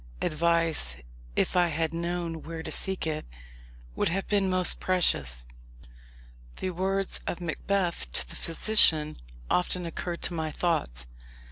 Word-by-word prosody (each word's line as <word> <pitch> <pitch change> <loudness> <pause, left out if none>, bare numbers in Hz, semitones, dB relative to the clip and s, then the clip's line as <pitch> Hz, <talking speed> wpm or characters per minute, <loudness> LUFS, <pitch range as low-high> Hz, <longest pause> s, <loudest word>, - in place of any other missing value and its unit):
Advice, 165 - +2 0.4
if - - 0
I 175 -1 +4
had 160 0 -2
known 170 -1 -3
where 165 0 -7
to - - -6
seek 190 -3 0
it, 155 -1 -2 0.7
would - - +1
have 190 +3 -2
been 200 -2 +1
most 185 -1 +3
precious. 65 - +4 1.1
The 185 - -3
words 190 +2 -1
of 175 - -3
Macbeth 175 - -2
to 60 - +1
the - - -10
physician 165 -4 +4 0.3
often 180 - 0
occurred 170 +1 -5
to - - 0
my 160 -1 -2
thoughts. 150 - -1
170 Hz, 135 wpm, -27 LUFS, 155-180 Hz, 1.1 s, I